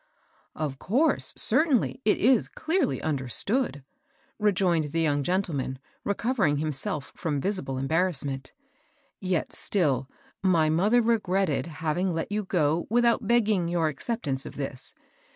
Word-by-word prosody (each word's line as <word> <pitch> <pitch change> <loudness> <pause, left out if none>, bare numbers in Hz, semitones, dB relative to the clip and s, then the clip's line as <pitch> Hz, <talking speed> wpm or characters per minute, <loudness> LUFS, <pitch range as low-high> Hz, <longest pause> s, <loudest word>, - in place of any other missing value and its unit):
" - - -35
Of 145 -4 -4
course 265 - +1
— - - -24
certainly, 270 -5 +2
it 215 - +3
is 245 0 +3
clearly 320 -3 -1
under 140 -5 -1
stood," 210 - 0 0.6
rejoined 180 -7 +1
the 165 - +1
young 145 -3 +1
gentleman, 150 -6 -1 0.3
recovering 200 - +1
himself 145 -1 -2
from 150 -4 -2
visible 140 -7 -2
embarrassment; 140 -2 -1 0.7
yet 185 -3 -1
still 135 - +1 0.3
my 165 -5 +3
mother 210 +9 +3
regretted 195 - +1
having 165 +3 -2
let 165 +4 -3
you 210 +1 -1
go 165 -3 0
without 235 +1 +2
beg 235 -2 +4
ging 195 -5 +1
your 170 -2 +1
acceptance 150 - -3
of - - -9
this. 135 -2 -6
170 Hz, 135 wpm, -27 LUFS, 145-210 Hz, 0.7 s, beg